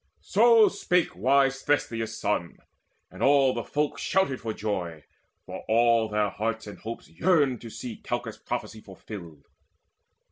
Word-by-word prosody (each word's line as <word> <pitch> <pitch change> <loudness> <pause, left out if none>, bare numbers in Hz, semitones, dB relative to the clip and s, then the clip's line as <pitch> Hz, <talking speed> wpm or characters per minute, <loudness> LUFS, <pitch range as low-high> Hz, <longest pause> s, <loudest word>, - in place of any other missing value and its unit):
So 225 +1 +5
spake 180 -3 0
wise 135 +6 +2
Thestius' 115 -6 -1
son, 100 -5 -2 0.5
and - - -11
all 135 -2 +4
the - - -3
folk 150 0 -2
Shouted 190 -9 0
for 115 - -3
joy; 90 -8 -4 0.4
for - - -8
all 115 0 +3
their 105 -1 +1
hearts 115 +1 -3
and 105 - -10
hopes 115 +1 -7
Yearned 140 - +1
to 115 - -8
see 115 +1 -7
Calchas' - - -5
prophecy 110 0 -5
fulfilled. 90 -6 -11
115 Hz, 140 wpm, -27 LUFS, 105-140 Hz, 0.5 s, So